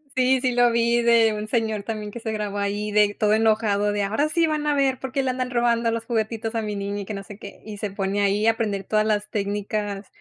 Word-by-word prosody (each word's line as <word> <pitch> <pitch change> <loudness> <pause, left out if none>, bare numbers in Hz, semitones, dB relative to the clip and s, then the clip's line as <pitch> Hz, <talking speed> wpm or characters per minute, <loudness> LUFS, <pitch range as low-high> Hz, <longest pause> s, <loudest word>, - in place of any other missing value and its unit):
Sí, 260 0 +3
sí 255 -1 0
lo 245 -1 +4
vi 235 +1 +2
de 230 -2 +4
un 210 0 -4
señor 220 -4 -1
también 215 -2 -5
que 235 +2 -8
se 220 - -3
grabó 210 -1 -3
ahí 205 +1 -2
de 205 0 +3
todo 210 0 +3
enojado 215 -2 +2
de: 205 -1 -1
"Ahora 255 +10 0
sí 335 0 +2
van 305 -1 -1
a 295 - +3
ver, 270 -2 +2
porque 265 +1 -2
le 260 - 0
andan 255 0 -3
robando 235 -1 +2
los 230 0 -3
juguetitos 225 0 -2
a 225 - 0
mi 210 -1 -4
niña", 200 0 -3
y - - -7
que 215 - -5
no 195 0 -6
sé 205 0 -11
qué. 200 -2 -11
Y 210 -1 -7
se 205 -1 -4
pone 195 0 -1
ahí 205 +2 +2
a - - +7
aprender 205 -4 -3
todas 215 0 +1
las 210 -1 0
técnicas 205 0 -3
215 Hz, 260 wpm, -23 LUFS, 205-235 Hz, -, a